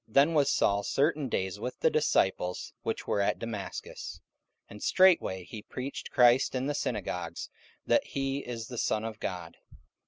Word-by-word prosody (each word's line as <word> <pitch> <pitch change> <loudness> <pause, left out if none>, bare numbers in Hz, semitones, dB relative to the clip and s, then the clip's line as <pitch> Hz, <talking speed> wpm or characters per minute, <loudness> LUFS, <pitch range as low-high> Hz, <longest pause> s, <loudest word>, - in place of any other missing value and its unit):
Then 140 +8 +4
was 145 -3 +3
Saul 100 0 +2
certain 145 +5 +1
days 95 -2 -2
with 125 +4 -5
the - - +4
disciples 95 -11 +1
which - - -3
were 100 - +1
at 100 - +1
Damascus. 105 -4 -6 0.5
44:009:020 - - -22
And 105 - -10
straightway 175 - +4
he 105 +4 -8
preached 130 +5 -6
Christ 125 +1 +4
in 130 +1 -1
the 145 - 0
synagogues, 90 - -3 0.3
that - - +3
he 135 0 -2
is 120 -4 -5
the 125 -1 -6
Son 110 0 0
of 110 -1 -6
God. 90 -3 -5
115 Hz, 165 wpm, -30 LUFS, 100-135 Hz, 0.5 s, Then